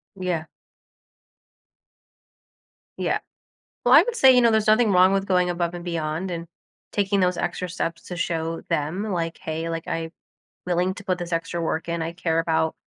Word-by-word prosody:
Yeah. 180 -4 -2 2.5
Yeah. - - 0 0.7
Well, - - +6
I - - +10
would 480 -1 -3
say, 265 - +7
you 250 - +6
know, 235 -1 +5
there's 220 -1 +2
nothing 215 +1 +4
wrong 185 +1 +6
with 195 0 0
going 180 -2 +2
above 175 0 -2
and 175 - -7
beyond 170 +1 -2
and 170 -1 -5 0.5
taking 200 -1 +1
those 180 -1 +2
extra 180 +1 -2
steps 165 -1 -3
to 180 - -7
show 165 -1 -2
them, 155 +7 -1
like, 165 -1 -2
"Hey. 160 +1 -4
Like, 165 0 -4
I'm 165 0 -3 0.6
willing 180 +1 +1
to 205 - -10
put 185 -2 0
this 175 -1 -5
extra 165 +1 -2
work 165 0 -2
in. 170 0 -2
I 165 +1 -2
care 165 -2 0
about 160 -1 0
175 Hz, 175 wpm, -24 LUFS, 165-185 Hz, 2.5 s, I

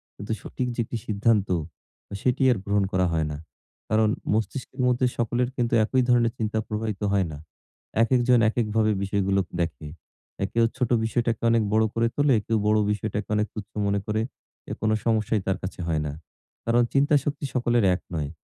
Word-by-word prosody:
কিন্তু 100 +2 -7
সঠিক 125 - -4
যে - - -7
একটি 115 - -4
সিদ্ধান্ত, 105 -1 +2 0.7
সেটি 125 +1 +1
আর 120 - +1
গ্রহণ 100 0 +2
করা 90 -1 +2
হয় 80 -1 +1
না। 75 - -4 0.5
কারণ 110 0 +3 0.2
মস্তিষ্কের 130 +4 -2
মধ্যে 125 +1 +2
সকলের 120 +1 0
কিন্তু 120 -2 0
একই 130 +3 +2
ধরনের 120 -2 +3
চিন্তা 110 0 -1
প্রবাহিত 110 -1 -3
হয় 100 -2 +2
না। 75 - -7 0.7
একেকজন 125 0 +3
একেক 115 0 0
ভাবে 110 -1 +3
বিষয়গুলো 100 0 +1 0.2
দেখে। 80 -2 -2 0.6
এ - - +3
কেউ 115 0 +4
ছোট 125 -3 0 0.2
বিষয়টাকে 115 0 0
অনেক 115 -1 +3
বড় 110 0 +4
করে 115 0 +2
তোলে, 145 -3 +3
কেউ 115 - +1
বড় 110 - +4
বিষয়টাকে 105 -1 -3
অনেক 105 +1 +1
তুচ্ছ 105 0 -7 0.2
মনে 100 0 +1
করে, 110 +1 0 0.5
এ - - -1
কোন 110 - +1 0.2
সমস্যাই 110 -2 +1
তার 95 -1 +1
কাছে 95 - -6
হয় 80 -2 0
না। 75 - -2 0.5
কারণ 120 +1 +3
চিন্তা 145 +2 +4
শক্তি 145 -1 -2
সকলের 120 -2 +2
এক - - -7
নয়। 75 -3 -2
110 Hz, 180 wpm, -25 LUFS, 100-120 Hz, 0.7 s, কেউ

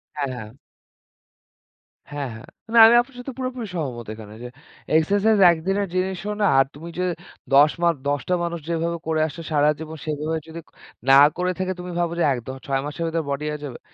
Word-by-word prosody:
হ্যাঁ, 140 -2 -2
হ্যাঁ। 110 0 -8 1.6
হ্যাঁ, 145 -2 -3
হ্যাঁ। 110 - -12 0.3
না - - +4
আমি 235 - +6
আপনার 250 +1 -13
সাথে 255 +1 -7
পুরোপুরি 255 -2 -4
সহমত 125 -8 -4
এখানে 110 -1 -11
যে - - -5 0.5
এক্সারসাইজ 205 +7 +3
একদিনের 195 +5 -1
জিনিসও 190 +2 -2
না। - - +4
আর 135 - +5
তুমি 165 +4 -9
যে - - +1 0.5
১০ 145 +2 +6
মাপ 170 -1 +3
১০ 145 -2 0
টা - - +3
মানুষ 170 0 -3
যেভাবে 170 0 -1
করেছে 160 0 -1
সারাজীবন 150 +2 0
সেভাবে 155 +2 -2
যদি 165 +1 -8
ক - - -24 0.4
না - - +8 0.2
করে 180 0 0
থাকে 185 0 -1
তুমি 180 0 -6
ভাবো 170 -1 0
যে - - +3
একদ 120 -1 -7 0.2
৬ 135 -1 0
মাসের 150 +3 -4
ভেতর 165 0 -1
বডি 140 +2 -2
হয়ে 150 -1 -5
যাবে? 125 -4 -8
160 Hz, 185 wpm, -23 LUFS, 145-185 Hz, 1.6 s, না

